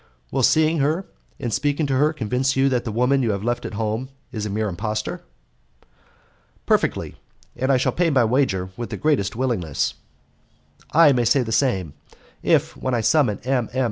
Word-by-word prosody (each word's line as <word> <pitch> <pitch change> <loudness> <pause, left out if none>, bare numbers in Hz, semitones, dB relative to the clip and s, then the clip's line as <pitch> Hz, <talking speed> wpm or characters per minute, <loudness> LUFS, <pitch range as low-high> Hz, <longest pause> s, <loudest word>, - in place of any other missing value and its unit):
"Will - - 0
seeing 155 0 +3
her 155 +7 0 0.3
and 120 -3 -3
speaking 145 +1 0
to 135 -2 0
her 150 +3 +3
convince 130 -1 -1
you 135 +1 +3
that 125 -3 -1
the 115 - -3
woman 125 +5 +2
you 120 - 0
have 100 0 -4
left 120 +1 -1
at - - -8
home 110 +4 -2 0.2
is 110 -4 -4
a - - -5
mere 105 +2 -1
impostor?" 105 +3 -3 1.4
"Perfectly, - - 0 0.4
and 130 +3 0
I 135 - +4
shall 125 - +1
pay 175 -1 +1
my 130 -6 +3
wager 110 -7 +1
with 120 +1 -5
the - - -5
greatest 140 -11 0
willingness." 115 - -1 1.0
"I 160 -2 +6
may 125 -3 +2
say 125 +3 +3
the 115 - -5
same. 95 - 0 0.5
If, - - +2
when 130 -1 -2
I 115 - 0
summon 115 -4 +2
M. 125 -2 0
M. 130 - -1
125 Hz, 185 wpm, -22 LUFS, 110-140 Hz, 1.4 s, I